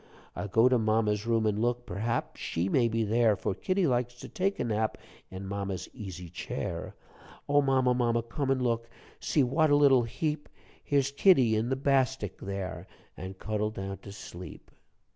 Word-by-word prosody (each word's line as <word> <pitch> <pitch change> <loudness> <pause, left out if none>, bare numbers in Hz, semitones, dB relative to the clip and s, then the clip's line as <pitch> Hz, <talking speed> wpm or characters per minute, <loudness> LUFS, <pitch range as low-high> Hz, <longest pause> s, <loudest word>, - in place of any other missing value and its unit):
"I'll 105 - -4
go 115 +5 +4
to 125 -1 +3
mamma's 110 -1 +1
room 115 -1 +2
an' 105 0 +1
look; 120 +1 0
Perhaps 110 +6 -3
she 85 +3 -1
may 120 0 +3
be 115 0 0
there; 110 0 +3
For 95 - -2
kittie 185 - 0
likes 120 -3 0
to - - -7
take 195 +2 -1
a - - +1
nap 110 -1 -1 0.3
In 95 +1 -7
mamma's 100 -1 -4
easy 95 -7 -7
chair. 85 - -5 0.5
"O 145 0 +4
mamma, 130 -2 +3
mamma, 120 -2 +1
come 135 +4 -3
an' 130 -1 +2
look? 115 -1 0 0.3
See 145 - +2
what 155 +5 +2
a 145 - +5
little 140 -3 +6
heap! 150 +6 -3 0.3
Here's 140 -1 +1
kittie 135 - +5
in 110 +3 0
the 130 - +1
bastik 130 -6 0
here, 95 -4 -5 0.3
All 95 +3 -7
cuddled 105 +2 -2
down 95 -1 -5
to 100 - -11
sleep." 90 -2 -10
115 Hz, 180 wpm, -29 LUFS, 105-130 Hz, 0.5 s, little